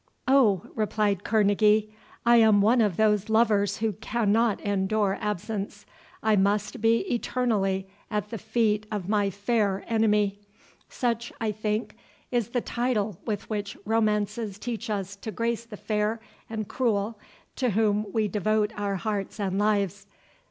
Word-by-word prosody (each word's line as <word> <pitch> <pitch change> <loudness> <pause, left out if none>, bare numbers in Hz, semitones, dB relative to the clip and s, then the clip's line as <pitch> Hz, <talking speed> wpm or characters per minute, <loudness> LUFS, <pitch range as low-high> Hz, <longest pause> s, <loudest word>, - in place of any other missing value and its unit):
"O," 235 -9 +4
replied 210 -3 0
Kerneguy, 215 0 +3 0.4
"I 235 0 +6
am 220 -3 +6
one 225 +4 +4
of 205 -6 +1
those 210 -1 +2
lovers 215 -3 +3
who 220 -1 0
cannot 220 +1 +1
endure 200 0 0
absence—I 210 +1 -3
must 205 +4 +1
be 225 +1 +4
eternally 210 -6 0 0.2
at 210 -2 -2
the 225 - -4
feet 215 -1 0
of 205 -4 -3
my 205 -1 +2
fair 200 0 0
enemy—such, 215 +2 -1
I 220 -2 0
think, 215 +1 -2 0.4
is 240 -4 +1
the 245 0 -1
title 220 -7 -1
with 215 -2 -3
which 205 -2 -4
romances 210 -1 0
teach 235 +1 -5
us 200 -2 -3
to 220 - -7
grace 230 +3 -2
the 220 -3 -10
fair 215 +2 -1 0.3
and 215 -2 -4
cruel 220 -3 -1 0.4
to 255 -2 +1
whom 210 -1 +1
we 220 0 +1
devote 210 +2 0
our 205 -1 -2
hearts 200 +2 -3
and 195 -1 -1
lives. 205 -2 0
210 Hz, 140 wpm, -26 LUFS, 205-225 Hz, 0.4 s, I